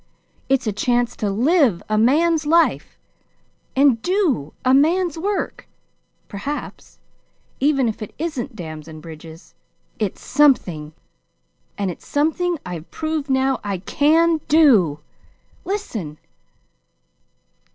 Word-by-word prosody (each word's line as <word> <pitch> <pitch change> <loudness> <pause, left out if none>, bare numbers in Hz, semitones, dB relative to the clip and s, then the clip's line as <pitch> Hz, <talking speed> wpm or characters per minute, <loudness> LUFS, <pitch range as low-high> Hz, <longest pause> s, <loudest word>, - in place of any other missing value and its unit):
It's 270 -1 +2
a 215 - 0
chance 240 +3 0
to 210 - -1
live 245 - +2
a 215 - 0
man's 305 +8 +3
life 335 +2 +2 0.8
and 265 -4 +4
do 340 - 0
a 255 - +4
man's 330 +4 +3
work, 395 +5 -3 0.6
perhaps 275 +9 -7 0.6
even 275 -2 +2
if 220 - -4
it 215 - -6
isn't 280 -6 -4
dams 155 -5 -8
and 155 -1 -10
bridges. 160 +1 -12 0.5
It's 210 -4 -3
something! 180 - +2 0.8
and 195 -2 -1
it's - - -13
something 325 +4 0
I've 175 -2 -7
proved 310 -2 -3
now 265 0 +1
I 200 -2 -2
CAN 315 - +2
DO! 220 - +4 0.6
Listen. 225 - -4
265 Hz, 110 wpm, -21 LUFS, 195-315 Hz, 0.8 s, and